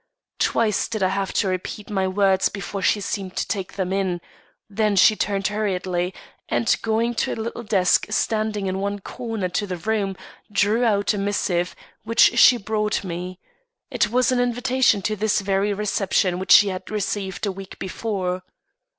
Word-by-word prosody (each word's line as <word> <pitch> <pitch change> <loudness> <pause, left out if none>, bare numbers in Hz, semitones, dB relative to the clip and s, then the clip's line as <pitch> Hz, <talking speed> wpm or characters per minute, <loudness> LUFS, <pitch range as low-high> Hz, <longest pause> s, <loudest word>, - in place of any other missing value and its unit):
Twice 215 -3 +1
did 215 -4 -2
I 185 - +3
have 195 0 -2
to 200 - +1
repeat 185 +3 -4
my 190 -2 0
words 190 0 +2
before 200 0 -5
she 205 - +2
seemed 195 -2 -4
to - - -1
take 195 -4 -3
them 190 -1 -2
in; 190 -3 -1 0.5
then 210 -1 0
she 215 +3 +6
turned 200 -2 -1
hurriedly, 185 -4 -1 0.4
and 225 - +2
going 225 +2 0
to - - -1
a - - -4
little 230 +1 -5
desk 195 -5 +2
standing 215 -1 -1
in 190 0 -2
one 200 +1 -2
corner 225 0 -5
of 180 - -4 0.2
the 180 - -3
room, 195 0 -1 0.3
drew 205 +4 +2
out 205 -2 +2
a 205 - -3
missive, 185 -3 -1 0.3
which 230 +1 +4
she 245 - +8
brought 215 -1 -1
me. 180 0 -6 0.5
It 235 -5 +1
was 250 +2 +2
an 250 - +1
invitation 245 -3 +2
to 215 -1 0
this 215 +1 +1
very 195 +1 0
reception 195 -3 0
which 190 - -3
she 205 - +7
had 185 -1 -6
received 205 -2 -3
a 200 - 0
week 190 0 -10
before. 185 -2 -3
200 Hz, 175 wpm, -23 LUFS, 190-220 Hz, 0.5 s, she